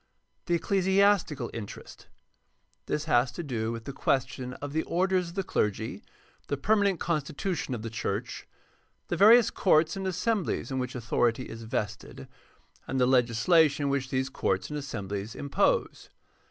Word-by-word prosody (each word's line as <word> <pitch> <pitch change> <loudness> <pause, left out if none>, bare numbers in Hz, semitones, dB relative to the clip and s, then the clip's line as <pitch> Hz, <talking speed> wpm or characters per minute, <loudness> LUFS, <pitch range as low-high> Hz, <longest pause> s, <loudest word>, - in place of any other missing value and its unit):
The 175 - +2
ecclesiastical 190 -7 +2
interest. 110 -3 -9 0.4
— - - -43
This 150 - -1
has 125 -5 +3
to 170 - -5
do 115 -6 -2
with 115 0 -6
the 140 - -6
question 125 -1 -1
of 145 +2 -7
the 160 - +1
orders 185 +1 0
of 170 - -12
the 195 - -1
clergy, 110 - -2 0.5
the 145 - -1
permanent 200 +2 +2
con 170 -3 0
stitution 145 -1 -3
of 110 - -7
the 115 - -4
church, 115 +1 -4 0.6
the - - 0
various 220 +5 +7
courts 165 -2 +3
and 190 -1 -3
assemblies 190 - -1
in 130 - -1
which 125 0 -4
authority 120 0 0
is 115 0 -9
vested, 110 0 -4 0.6
and 135 - -1
the 125 - +4
legislation 140 +4 +3
which 135 -1 -1
these 130 0 -1
courts 95 -2 -1
and 150 - -2
assemblies 105 -5 -5
impose. 140 -1 0
140 Hz, 155 wpm, -28 LUFS, 120-175 Hz, 0.6 s, various